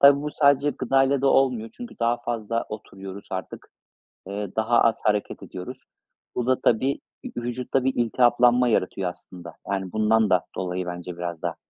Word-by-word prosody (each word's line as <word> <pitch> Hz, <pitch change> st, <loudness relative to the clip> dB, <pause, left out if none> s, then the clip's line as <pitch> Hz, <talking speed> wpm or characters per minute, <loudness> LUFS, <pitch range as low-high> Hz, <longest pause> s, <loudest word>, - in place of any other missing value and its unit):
Tabii 140 Hz, 0 st, +7 dB
bu 150 Hz, -, -3 dB
sadece 140 Hz, -1 st, +3 dB
gıdayla 135 Hz, +1 st, +2 dB
da -, -, +3 dB
olmuyor 125 Hz, -5 st, +2 dB
çünkü 245 Hz, 0 st, -9 dB
daha 120 Hz, +1 st, +2 dB
fazla 115 Hz, -1 st, -2 dB
oturuyoruz 100 Hz, -2 st, -9 dB
artık, 95 Hz, 0 st, -6 dB, 0.6 s
eee, 100 Hz, 0 st, -5 dB
daha 115 Hz, +2 st, +3 dB
az 115 Hz, -1 st, +2 dB
hareket 105 Hz, -1 st, 0 dB
ediyoruz. 125 Hz, +8 st, -8 dB, 0.6 s
Bu 125 Hz, -, -1 dB
da 130 Hz, 0 st, +2 dB
tabii 130 Hz, +5 st, +2 dB, 0.4 s
ü -, -, -1 dB
vücutta 125 Hz, +2 st, -1 dB
bir 130 Hz, -, +2 dB
iltihaplanma 120 Hz, +1 st, +4 dB
yaratıyor 95 Hz, -3 st, 0 dB
aslında. 85 Hz, -1 st, -12 dB, 0.2 s
Yani, 95 Hz, -2 st, -2 dB
bundan 110 Hz, 0 st, +3 dB
da 90 Hz, -1 st, +3 dB
dolayı 90 Hz, 0 st, -3 dB
bence 90 Hz, 0 st, -6 dB
biraz 85 Hz, -2 st, -5 dB
da. -, -, -2 dB
115 Hz, 165 wpm, -25 LUFS, 95-130 Hz, 0.6 s, Tabii